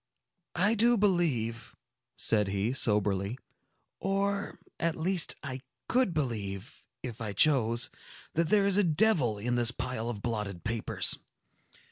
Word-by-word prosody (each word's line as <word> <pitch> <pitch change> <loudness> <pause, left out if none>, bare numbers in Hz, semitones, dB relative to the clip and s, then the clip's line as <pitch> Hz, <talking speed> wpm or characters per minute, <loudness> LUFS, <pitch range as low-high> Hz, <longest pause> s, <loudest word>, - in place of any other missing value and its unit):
"I 205 +5 +3
do 235 +2 +4
believe," 155 - 0 0.4
said 105 -3 +2
he, 100 +5 -1
soberly, 105 -2 0 0.6
"or, 200 +1 -1 0.2
at 165 -1 0
least, 175 +1 +1
I 130 -2 -5 0.3
could 250 -5 +2
believe, 110 - -4 0.2
if 120 -3 -7
I 105 -2 -4
chose, 120 -1 +3 0.4
that 165 0 0
there 205 -2 +4
is 200 -1 +3
a - - +4
devil 160 - +3
in 120 +4 -1
this 120 -1 +6
pile 125 -2 -4
of 105 -4 -6
blotted 105 -6 -4
papers. 115 -1 -1
125 Hz, 130 wpm, -29 LUFS, 110-180 Hz, 0.6 s, this